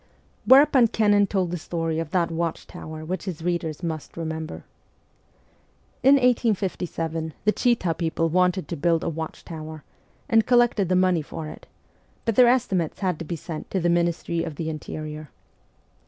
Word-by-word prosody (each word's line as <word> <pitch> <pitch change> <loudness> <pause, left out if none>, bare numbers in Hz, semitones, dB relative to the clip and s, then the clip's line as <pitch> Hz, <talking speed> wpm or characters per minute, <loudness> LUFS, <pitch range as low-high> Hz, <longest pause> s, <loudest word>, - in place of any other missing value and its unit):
Whereupon 270 -2 +7
Kennan 205 -2 +3
told 185 -3 -1
the 175 - -3
story 165 0 -2
of 165 -2 -3
that 170 0 0
watchtower 160 -1 -5
which 185 +4 -4
his 175 -4 -5
readers 170 -2 -2
must 160 -2 -5
remember. 160 -1 -5 1.4
In 270 +2 +7
1859 185 - 0
the 210 - +5
Chita 230 -8 +1
people 165 0 -1
wanted 180 0 +1
to 170 - -2
build 165 +1 +1
a - - -1
watchtower, 160 -1 -7 0.4
and 225 -1 +3
collected 240 -6 +3
the 185 - +3
money 185 -2 +3
for 155 +1 -7
it; - - -12 0.6
but 230 - +1
their 250 0 +7
estimates 210 -11 +1
had 185 -5 0
to 165 - -5
be 170 - -4
sent 160 0 -7
to 190 - -1
the 175 0 +1
Ministry 170 -1 0
of 160 -3 -5
the 160 +1 -3
Interior. 155 -1 -7
170 Hz, 155 wpm, -24 LUFS, 160-195 Hz, 1.4 s, Whereupon